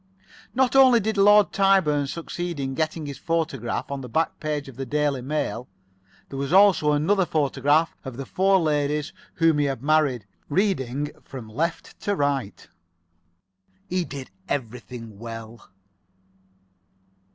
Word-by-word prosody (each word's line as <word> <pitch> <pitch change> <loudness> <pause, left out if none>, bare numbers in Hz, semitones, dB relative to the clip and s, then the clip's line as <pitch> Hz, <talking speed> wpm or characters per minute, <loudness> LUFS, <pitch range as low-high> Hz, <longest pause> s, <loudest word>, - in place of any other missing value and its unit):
Not 260 0 +2
only 260 -3 +7
did 220 +1 -1
Lord 205 +1 +5
Tyburn 185 -8 +3
succeed 170 +1 -5
in 135 -1 -2
getting 155 +1 -2
his 140 -2 -7
photograph 155 -8 -2
on 140 - -3
to 130 - -7
the - - -14
back 160 +8 -1
page 150 -2 -3
of 135 - -11
the 135 - -4
"Daily 145 -1 0
Mail." 130 -4 -3 0.6
There 135 - -6
was 140 +1 -3
also 185 -6 +5
another 190 +7 +2
photograph 150 0 +1
of 130 -3 -7
the 135 - -5
four 195 +5 +3
ladies 150 -2 0 0.2
whom 165 -2 +3
he 145 - +2
had 135 -3 -3
married, 145 -7 +2 0.2
reading 145 - 0
from 130 -4 -9
left 160 +10 -3
to 205 - -1
right. 140 - -2 1.2
He 180 0 0
did 135 -9 -8 0.2
everything 115 -4 -5
well. 115 0 -9
150 Hz, 140 wpm, -24 LUFS, 135-170 Hz, 1.2 s, only